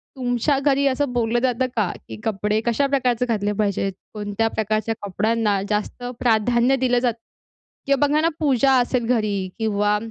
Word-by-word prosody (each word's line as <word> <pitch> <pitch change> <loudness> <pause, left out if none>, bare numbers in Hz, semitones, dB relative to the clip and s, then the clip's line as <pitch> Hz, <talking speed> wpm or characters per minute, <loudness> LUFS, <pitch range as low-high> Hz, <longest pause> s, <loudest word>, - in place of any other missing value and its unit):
तुमच्या 250 +2 0
घरी 280 0 +2
असं 275 0 0
बोललं 240 0 +1
जातं 255 0 +1
का, 210 -6 +1 0.2
की 110 - -7
कपडे 210 0 0
कशा 240 +4 +1
प्रकारचे 250 -3 +1
घातले 210 -4 -1
पाहिजेत? 200 -1 0 0.2
कोणत्या 210 +1 -1
प्रकारच्या 220 0 -1
कपड्यांना 210 0 0
जास्त 210 +3 -2 0.2
प्राधान्य 235 +2 +3
दिलं 250 -2 +2
जातं? 240 -2 0 0.7
किंवा 280 +1 +3
बघा 300 +2 +2
ना, 330 - +3
पूजा 275 -3 +3
असेल 245 -1 0
घरी 210 -3 -1 0.2
किंवा 210 -1 +1
235 Hz, 155 wpm, -22 LUFS, 210-260 Hz, 0.7 s, प्राधान्य